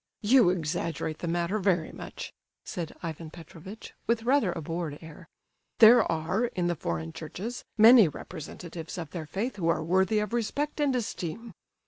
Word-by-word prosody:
"You 230 -2 +6
exaggerate 165 -2 -2
the 175 - -4
matter 175 +5 0
very 180 -5 +1
much," - - -8 0.3
said 165 -3 -5
Ivan 165 -1 -5
Petrovitch, 170 +5 -11
with 230 -1 +1
rather 245 -6 +3
a 170 - -5
bored 165 -1 -4
air. 160 +1 -12 0.5
"There 230 -3 +7
are, 165 +8 0
in 185 -7 -2
the 175 0 +1
foreign 80 - -4
Churches, 200 +10 -6
many 225 -2 +8
representatives 165 +2 -8
of 165 -4 -6
their 165 -4 -6
faith 205 - -3
who 170 -4 -1
are 165 -1 +1
worthy 190 +5 +2
of 210 +1 -1
respect 280 +7 -2
and 285 -3 +2
esteem." 225 -1 -4
175 Hz, 160 wpm, -28 LUFS, 165-220 Hz, 0.5 s, many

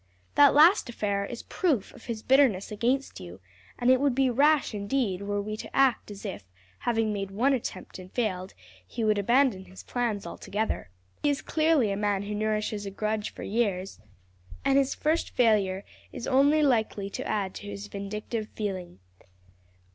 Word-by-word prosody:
That 285 -1 +6
last 320 +1 +6
affair 200 -3 -1
is 240 - -7
proof 300 - -1
of - - -15
his 225 -3 -5
bitterness 260 -9 +3
against 245 +6 -1
you, 90 0 -10 0.4
and 245 +1 +3
it 260 0 +4
would 280 -3 +2
be 265 -1 +3
rash 290 +2 +3
indeed 200 -2 -1
were 205 0 -2
we 215 +1 -4
to - - -9
act 270 -5 +3
as 205 -1 -9
if, 100 - -5 0.4
having 225 -2 0
made 195 -1 -3
one 240 +8 +2
attempt 245 -6 -5
and 185 0 -11
failed, 190 -6 -2 0.3
he 230 - -4
would 215 -1 +2
abandon 235 -2 +2
his 185 +1 -12
plans 230 -6 -2
altogether. 205 - -3 0.3
He 295 - +2
is 285 - -1
clearly 310 -9 +2
a 195 - -2
man 205 -1 0
who 205 +1 -4
nourishes 215 -1 -1
a - - -2
grudge 215 +2 -2
for - - -9
years, 195 - -1 0.7
and 270 - +3
his 275 -1 0
first 315 +3 0
failure 205 -5 +2 0.3
is - - -6
only 285 +3 +4
likely 220 -7 +1
to - - -5
add 195 -3 -1
to 205 - -9
his 200 0 -6
vindictive 210 +2 -5
feeling. 190 - -4
215 Hz, 175 wpm, -27 LUFS, 200-260 Hz, 0.7 s, That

